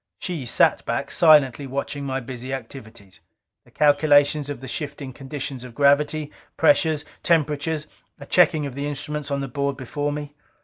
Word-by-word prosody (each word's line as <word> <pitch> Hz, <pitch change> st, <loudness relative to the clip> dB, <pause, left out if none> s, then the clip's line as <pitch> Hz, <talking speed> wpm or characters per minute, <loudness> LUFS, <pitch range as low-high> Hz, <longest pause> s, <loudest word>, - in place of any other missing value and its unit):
She 165 Hz, -9 st, -4 dB
sat -, -, +3 dB
back, -, -, -2 dB
silently 145 Hz, -4 st, +4 dB
watching 140 Hz, +1 st, -4 dB
my 135 Hz, -1 st, -2 dB
busy 130 Hz, +1 st, -7 dB
activities: 110 Hz, -7 st, -11 dB, 0.5 s
the -, -, -21 dB
calculations 145 Hz, 0 st, +3 dB
of 145 Hz, -, -5 dB
the 130 Hz, -, -9 dB
shifting 140 Hz, -1 st, -5 dB
conditions 135 Hz, -1 st, -6 dB
of 125 Hz, -2 st, -11 dB
gravity, 145 Hz, +2 st, +2 dB, 0.3 s
pressures, 160 Hz, -, +3 dB, 0.2 s
temperatures; 155 Hz, -1 st, +1 dB, 0.3 s
a 140 Hz, -, -9 dB
checking 155 Hz, -2 st, +3 dB
of 140 Hz, -, -5 dB
the 140 Hz, +2 st, -4 dB
instruments 150 Hz, 0 st, -4 dB
on 140 Hz, -1 st, -1 dB
the 135 Hz, -, -3 dB
board 140 Hz, +1 st, -2 dB
before 145 Hz, +3 st, -3 dB
me. 145 Hz, 0 st, -6 dB
145 Hz, 160 wpm, -23 LUFS, 135-150 Hz, 0.5 s, silently